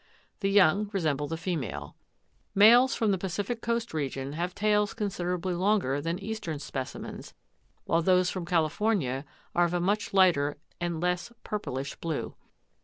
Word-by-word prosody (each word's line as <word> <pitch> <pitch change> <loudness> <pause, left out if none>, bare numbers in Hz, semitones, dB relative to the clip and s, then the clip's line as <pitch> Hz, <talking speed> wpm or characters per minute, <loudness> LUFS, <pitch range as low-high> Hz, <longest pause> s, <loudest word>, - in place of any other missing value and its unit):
The 195 - 0
young 200 +1 +4
resemble 150 -6 0
the 165 - -3
female. 165 - -4 0.6
Males 240 +6 +7
from 220 -3 +2
the 190 - 0
Pacific 200 +5 -3
coast 235 -3 -1
region 135 -2 -3
have 175 +3 -3
tails 210 0 +2
considerably 180 -3 -2
longer 180 -7 +1
than 165 +3 -2
eastern 200 -5 -4
specimens, 135 -2 -6 0.5
while 165 - +2
those 180 +1 +3
from 180 -3 -5
California 165 - +1 0.3
are 175 - +4
of 175 +1 -1
a - - +1
much 205 +4 0
lighter 170 -7 +4 0.2
and 175 -2 -2
less 180 +5 -1
purplish 140 -10 -4
blue. 160 -3 -3
180 Hz, 145 wpm, -28 LUFS, 160-205 Hz, 0.6 s, Males